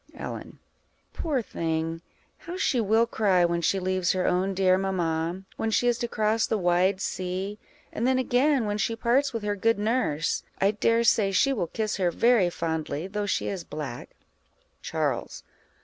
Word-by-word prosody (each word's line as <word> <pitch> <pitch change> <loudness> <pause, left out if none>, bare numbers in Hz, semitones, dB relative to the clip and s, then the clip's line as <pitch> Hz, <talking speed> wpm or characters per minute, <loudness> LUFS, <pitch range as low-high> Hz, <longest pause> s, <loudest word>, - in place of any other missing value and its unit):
Ellen. - - -7 0.6
Poor 285 -7 -1
thing! 165 -2 -3 0.3
how 345 +2 -8
she 265 -9 +1
will 220 +2 +3
cry 195 -6 +2
when 170 0 0
she 195 - +1
leaves 185 0 0
her 185 -1 -1
own 190 +2 +1
dear 185 -1 +4
mamma, 175 -2 -1
when 225 - -1
she 245 +3 +2
is 240 -1 +2
to 240 - -1
cross 220 0 +1
the 220 - 0
wide 180 +1 +2
sea! 190 +3 -3 0.3
and 235 - 0
then 260 0 +3
again, 260 +1 +2
when 205 0 -2
she 225 +2 0
parts 250 +5 +2
with 230 -3 -4
her 205 0 -1
good 225 +3 +2
nurse; 210 - 0 0.2
I 195 +1 +3
dare 230 +2 +2
say 210 -4 +3
she 275 +8 +3
will 190 -9 -1
kiss 215 +4 -2
her 185 -3 +2
very 225 0 +3
fondly, 160 -2 -3
though 205 +1 -3
she - - -1
is 190 -3 -3
a - - -14
black. 145 -5 -6 0.7
_Charles. - - -2
200 Hz, 180 wpm, -26 LUFS, 180-230 Hz, 0.7 s, dear